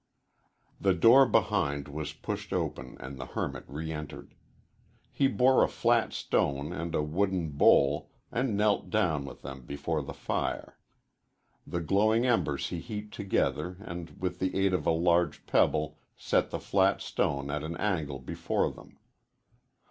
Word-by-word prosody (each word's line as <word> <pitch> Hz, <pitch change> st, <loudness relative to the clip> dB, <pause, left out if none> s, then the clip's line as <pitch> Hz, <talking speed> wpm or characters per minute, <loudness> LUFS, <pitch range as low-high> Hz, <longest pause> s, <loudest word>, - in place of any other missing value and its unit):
The 95 Hz, -2 st, +3 dB
door 120 Hz, +9 st, +7 dB
behind 70 Hz, -8 st, +1 dB
was 75 Hz, 0 st, -5 dB
pushed -, -, -6 dB
open 65 Hz, 0 st, -3 dB
and 65 Hz, +1 st, -8 dB
the 65 Hz, -, -6 dB
hermit -, -, -3 dB
re 80 Hz, +4 st, -5 dB
entered. 75 Hz, -2 st, -7 dB, 0.8 s
He 135 Hz, -, +2 dB
bore 130 Hz, 0 st, +4 dB
a -, -, +3 dB
flat -, -, +2 dB
stone 70 Hz, +4 st, -1 dB
and 85 Hz, -1 st, -4 dB
a 75 Hz, -, +1 dB
wooden 90 Hz, +1 st, 0 dB
bowl, 70 Hz, 0 st, +4 dB, 0.2 s
and 120 Hz, -4 st, 0 dB
knelt 105 Hz, 0 st, +2 dB
down 85 Hz, -10 st, +1 dB
with -, -, -10 dB
them 65 Hz, 0 st, -7 dB
before 70 Hz, +4 st, -2 dB
the 70 Hz, -, -7 dB
fire. -, -, -3 dB, 0.9 s
The 85 Hz, -, -2 dB
glowing 110 Hz, +7 st, +3 dB
embers 75 Hz, -, +1 dB
he 85 Hz, -, -4 dB
heaped 105 Hz, +2 st, -7 dB
together 90 Hz, -3 st, -1 dB
and 85 Hz, -4 st, -8 dB
with 90 Hz, -1 st, -3 dB
the 95 Hz, 0 st, -1 dB
aid 95 Hz, -1 st, +2 dB
of 90 Hz, -, 0 dB
a -, -, +5 dB
large 85 Hz, +1 st, +2 dB
pebble 75 Hz, 0 st, +1 dB, 0.2 s
set -, -, +1 dB
the -, -, -3 dB
flat 95 Hz, 0 st, +2 dB
stone 70 Hz, 0 st, -1 dB
at 75 Hz, 0 st, -2 dB
an 80 Hz, +2 st, -5 dB
angle 80 Hz, -9 st, -1 dB
before 65 Hz, -, -1 dB
them. -, -, -15 dB
85 Hz, 155 wpm, -29 LUFS, 70-100 Hz, 0.9 s, door